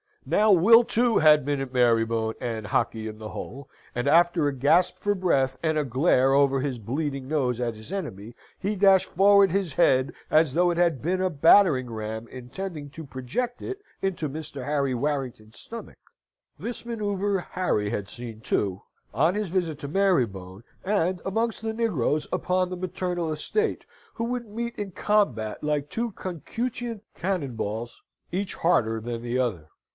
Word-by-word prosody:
Now 215 0 +3
Will, 220 +6 +7
too, 235 0 +2
had 150 -3 +5
been 145 -1 0
at 135 -1 -6
Marybone 115 -2 +2
and 115 -4 -3
Hockley 110 +1 -1
in 110 0 -7
the 110 0 -7
Hole, 135 +5 -8 0.3
and 120 +3 -1
after 170 0 +4
a 145 - 0
gasp 145 +7 +2
for 205 - +1
breath 135 -8 +1
and 160 -1 +1
a 150 - +2
glare 135 0 +3
over 140 -1 +4
his 135 -2 -2
bleeding 135 +4 -3
nose 130 -5 0
at 120 -2 -2
his 110 +9 -12
enemy, 120 - -5 0.2
he 205 +2 -2
dashed 195 -1 +4
forward 200 0 +5
his 190 -5 -1
head 130 0 +3 0.2
as 155 -3 +3
though 175 +3 +3
it 170 - -3
had 170 -6 +2
been 185 +4 0
a 185 - +2
battering 150 -4 +5
ram, 110 +1 -5
intending 145 +5 -7
to 160 - -8
project 135 - -4
it 390 +1 -5 0.2
into 175 -6 -1
Mr. 145 -2 -7
Henry 140 -2 0
Warrington's 125 -6 -3
stomach. 230 0 -9 0.6
This 240 0 -6
manoeuvre 205 -4 -1
Harry 105 - 0
had 100 -1 -3
seen, 115 0 -9
too, 100 -4 -1 0.3
on 160 +5 +3
his 210 -3 -2
visit 165 -4 -1
to 140 - -6
Marybone, 120 - 0 0.2
and 185 -2 +1
amongst 225 +4 -1
the 220 0 -2
negroes 165 - 0
upon 185 0 0
the 185 - -5
maternal 180 -2 -2
estate, 430 - -1 0.3
who 230 - -3
would 240 -1 -3
meet 235 +3 -4
in 205 -2 -4
combat 175 - 0
like 150 -1 -1
two 235 0 -2
concutient 225 - -5
cannon 170 -9 -2
balls, 110 +2 -4 0.3
each 190 +2 -2
harder 115 -9 +2
than 115 +1 -5
the 120 +1 -1
other. 105 -12 -1
155 Hz, 170 wpm, -26 LUFS, 125-195 Hz, 0.6 s, Will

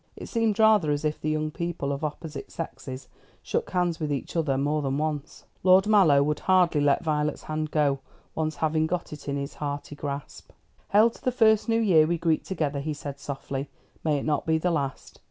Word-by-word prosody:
It - - -8
seemed 225 -3 +1
rather 215 -7 +5
as 145 +1 0
if 150 0 -1
the 155 - -1
young 155 0 -1
people 170 -4 -3
of 140 +2 -4
opposite 150 -1 -5
sexes 135 -5 -7 0.4
shook 470 0 -2
hands 175 -2 0
with 155 -2 -2
each 140 +3 -4
other 150 -5 +1
more 145 +2 0
than 135 -1 -1
once. 150 -1 -3 0.2
Lord 185 +1 +6
Mallow 185 -10 +5
would 150 +1 -1
hardly 180 -5 +3
let 145 +3 +2
Violet's 150 -2 -1
hand 155 0 -3
go, 145 -3 +1 0.3
once 155 -1 -2
having 160 0 +1
got 175 -1 -3
it 150 - -8
in 140 - -1
his 140 0 -4
hearty 145 0 -5
grasp. 140 -1 -7 0.4
"Hail 215 +3 +5
to - - -17
the 255 - +1
first 220 -2 +3
new 225 0 +3
year 170 -8 +5
we 170 +1 0
greet 160 -1 +1
together," 150 -6 -2
he 150 +2 -3
said 140 -1 -7
softly. 140 0 -5 0.3
"May 150 -2 +2
it 140 - -4
not 150 +2 0
be 160 0 +3
the 175 +3 0
last. 140 -4 -3
155 Hz, 210 wpm, -26 LUFS, 145-175 Hz, 0.4 s, Lord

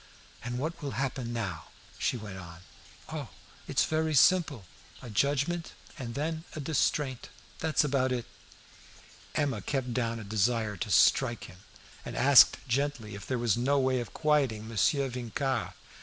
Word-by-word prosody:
"And 120 +1 -3
what 160 +7 -3
will 140 -2 -4
happen 130 -3 -2
now?" 100 -8 -4 0.3
she - - 0
went 100 -4 -8
on. 85 -1 -11 0.5
"Oh, - - -5 0.4
it's - - +2
very 155 0 0
simple; 145 - +4 0.3
a 120 - -9
judgment 145 +8 0 0.2
and 120 -6 -6
then 160 +2 -2
a - - -4
distraint 145 -3 0 0.3
that's 160 -1 +2
about 135 -3 +1
it!" 125 -2 -2 1.1
Emma 145 -3 0
kept 130 -4 -2
down 115 -2 -1
a - - -7
desire 110 +1 0
to 115 +1 -4
strike 120 +3 +4
him, 90 - -11 0.5
and - - -7
asked 140 0 +7
gently 130 -4 -1
if 100 -1 -8
there 130 - -1
was 120 -4 +2
no 135 +4 +2
way 130 -1 +2
of 120 - -6
quieting 135 -8 +1
Monsieur 115 - +2
Vincart. 125 +1 -2
130 Hz, 155 wpm, -29 LUFS, 115-145 Hz, 1.1 s, asked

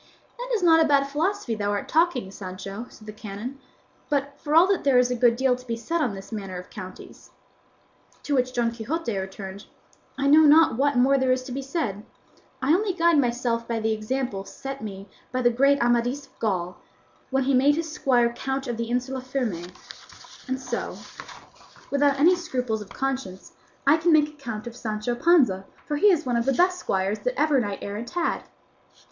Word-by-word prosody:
"That - - -5
is 410 - -1
not 325 -2 +6
bad 280 -1 +4
philosophy 315 - -1
thou 205 -2 -2
art 205 - -3
talking, 315 - +1
Sancho," 195 +4 -7
said 215 - -16
the 215 - -8
canon; 215 +6 -7 0.5
"but 280 -1 0
for 300 0 -1
all 335 +2 +8
that 390 -1 0
there 275 -3 +4
is 250 0 +3
a - - +1
good 240 -1 +4
deal 260 0 +2
to 250 0 -14
be 230 - -1
said 330 +9 -2
on 240 -9 0
this 195 +3 -10
matter 195 -4 -5
of 180 - -10
counties." 185 0 -10 0.9
To 290 - -2
which 255 -2 +1
Don 240 -2 0
Quixote 235 +2 -3
returned, 190 +1 -6 0.5
"I 275 - -1
know 295 +2 +7
not 310 -2 +6
what 280 +1 +1
more 270 +2 +4
there 260 -1 +2
is 255 0 +1
to 255 - -9
be 270 +2 -3
said; 265 - -3 0.6
I 285 +4 +4
only 390 +2 +1
guide 340 -3 +3
myself 240 -2 0
by 230 -1 -1
the 220 0 0
example 215 -2 -3
set 270 +6 -7
me 200 -2 -7 0.2
by 255 0 -1
the 240 - +5
great 275 +4 +3
Amadis 240 +4 +1
of - - -30
Gaul, 180 -4 -2 0.5
when 270 0 +1
he 275 +1 +1
made 275 +3 +4
his 320 -1 -3
squire 240 -5 +2
count 270 +2 -3
of 240 -3 -3
the 230 0 -3
Insula 255 +2 -2
Firme; 245 -10 -3 0.8
and 260 0 -2
so, 260 - -4 0.9
without 280 0 +2
any 345 +5 +6
scruples 250 -10 -3
of 205 - -10
conscience, 265 -9 -4 0.3
I 285 +3 +6
can 335 +2 +2
make 300 -1 +5
a - - -14
count 245 -8 -7
of 235 -1 -8
Sancho 215 0 -3
Panza, 240 - +3 0.2
for 295 - -2
he 415 +7 +5
is 320 -5 +1
one 245 -2 0
of 235 - 0
the 270 - +2
best 360 +4 +2
squires 195 +2 -1
that - - -2
ever 300 -3 +3
knight 205 -4 -3
errant 210 +4 -5
had." 345 +5 -1
255 Hz, 200 wpm, -25 LUFS, 220-290 Hz, 0.9 s, all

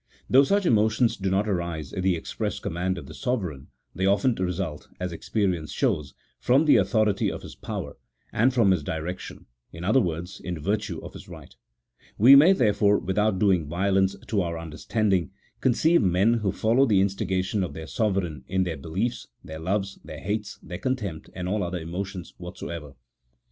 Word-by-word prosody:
Though 135 +2 +6
such 200 +6 +1
emotions 110 -1 +3
do 95 -1 -2
not 100 +3 +1
arise 85 -6 -3
at 95 - -2
the 95 -1 +2
express 80 - -4
command 90 +2 -2
of - - -7
the - - -10
sovereign 95 - -3 0.3
they 95 +1 0
often 100 +6 +3
result 90 -5 -3
(as 90 -1 -3
experience 90 -3 -1
shows) 75 -2 -1 0.2
from 135 +6 +3
the 150 - +6
authority 110 -4 +2
of - - -7
his - - -9
power, - - -6 0.4
and 125 +4 +3
from 115 -6 +4
his 90 -5 +1
direc 80 +5 -4
tion; - - -10 0.3
in 80 +1 -9
other 110 +8 +4
words, 90 0 -4
in 90 -2 -4
virtue 100 +7 -2
of - - -9
his - - -11
right; - - -12 0.6
we 125 +6 +9
may, 155 +7 +8
there 120 - +3
fore, 105 0 +3
without 95 +2 0
doing 90 -6 +2
violence 95 +3 +1
to 100 -2 0
our 85 -2 -3
understanding, 85 +3 -1 0.3
conceive 160 +7 +3
men 95 +3 +3
who 100 -3 0
follow 120 +7 +3
the 105 -4 +4
instigation 95 0 0
of 90 - -4
their 80 - -6
sovereign 95 - -1
in 95 0 +1
their 85 -3 -3
belief 90 - -1
s, 120 - -11 0.2
their 80 0 -8
loves, 95 +3 -2
their - - -8
hates, 105 +1 -3
their 90 0 -7
contempt, 105 -11 -3
and 90 -1 -4
all 105 +3 0
other 90 0 -2
emotions 90 +2 -6
whatsoever. 85 -4 -7
95 Hz, 185 wpm, -26 LUFS, 85-110 Hz, 0.6 s, we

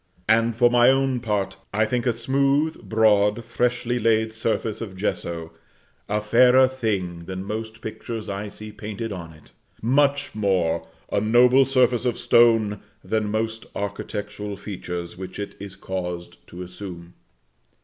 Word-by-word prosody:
And, 115 +1 +3
for 120 +1 +4
my 120 0 +6
own 135 -1 +2
part, 105 -4 -2
I 110 +2 +2
think 125 +2 -1
a - - +4
smooth, 140 +6 0
broad, 110 0 +3
freshly 120 +1 0
laid 110 -1 +2
surface 110 -1 -2
of 100 -5 -6
gesso 85 -4 -3 0.6
a 105 +1 +1
fairer 125 +4 +5
thing 100 -10 -3
than 95 +1 -5
most 110 +2 -5
pictures 110 0 -6
I 100 +1 -4
see 105 +1 -9
painted 105 +1 -6
on 85 -4 -7
it; 75 -1 -18 0.3
much 140 +4 +2
more, 90 -6 0 0.2
a - - +1
noble 125 +5 +5
surface 125 -2 +2
of 125 - 0
stone 115 -3 +4 0.2
than 110 -1 -1
most 110 +1 -2
architectural 105 0 -5
features 90 -4 -6
which 95 -1 -7
it 100 - -5
is 100 -2 -8
caused 90 -2 -6
to 90 +1 -8
assume. 90 -1 -9
110 Hz, 145 wpm, -24 LUFS, 100-120 Hz, 0.6 s, my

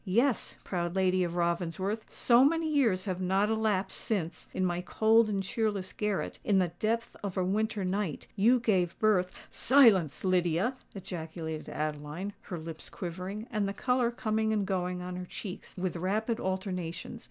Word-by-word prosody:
Yes, 235 +7 +1
proud 175 -1 -2
lady 185 -1 +3
of 175 -1 -3
Ravensworth—so 185 +8 +2
many 325 +3 +3
years 240 -12 +2
have 185 -2 -2
not 195 +3 +2
elapsed 215 -3 0
since, 185 -7 -2
in 185 - 0
my 175 -1 0
cold 220 +4 +4
and 195 -2 0
cheerless 205 -2 -1
garret, 210 -2 -2
in 200 - +3
the 180 -2 +3
depth 230 +2 -1
of 195 -2 -4
a 185 - +2
winter 210 +1 0
night, 185 -4 -2
you 230 +5 +5
gave 190 -7 +1
birth——" 195 -4 +3 0.2
"Silence, 220 - +5
Lydia!" 180 +4 +2 0.2
ejaculated 160 -4 -5
Adeline, 155 +6 -4
her 175 - -6
lips 160 0 -7
quivering, 185 +4 -5
and 210 -3 0
the 200 - -2
colour 250 +2 +1
coming 220 -2 0
and 210 -2 +1
going 180 -2 -2
on 180 0 -5
her 180 - -5
cheeks 185 -1 -7
with 185 -1 -2
rapid 215 +6 -1
alternations. 185 +1 -3
190 Hz, 160 wpm, -30 LUFS, 180-220 Hz, 0.2 s, you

